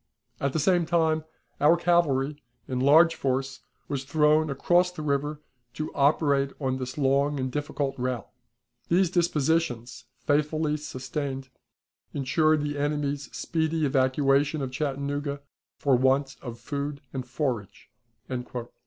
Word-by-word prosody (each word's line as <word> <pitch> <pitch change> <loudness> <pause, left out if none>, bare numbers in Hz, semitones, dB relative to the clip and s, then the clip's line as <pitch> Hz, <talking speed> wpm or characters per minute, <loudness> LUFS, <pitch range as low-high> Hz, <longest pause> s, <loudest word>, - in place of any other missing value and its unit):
At 140 -1 -1
the 160 - +1
same 175 +1 +2
time, 160 -2 +2 0.3
our 155 +4 +5
cavalry, 150 -5 +1 0.3
in 130 -1 -2
large 160 +5 +6
force, 135 -1 -2 0.3
was 135 -2 -3
thrown 150 +2 +3
across 175 +6 +2
the 155 -4 -7
river 145 +1 -1 0.3
to 155 +1 -4
operate 140 -1 +3
on 130 -2 -1
this 130 +1 -5
long 140 +1 +2
and 130 0 -2
difficult 145 -1 -3
route. 125 -3 -2 0.6
These 180 0 +3
dispositions, 150 -8 0
faithfully 150 +3 0
sustained, 135 -1 -5 0.7
insured 150 +2 +2
the 145 -1 -3
enemy's 145 -1 -1
speedy 160 -2 -1
evacuation 135 +2 +2
of 130 - -4
Chattanooga 140 +1 -2 0.4
for 140 -4 +3
want 135 +2 +2
of 120 -3 -7
food 140 +3 -4
and 130 -1 -3
forage." 125 -5 -4
145 Hz, 125 wpm, -27 LUFS, 135-155 Hz, 0.7 s, large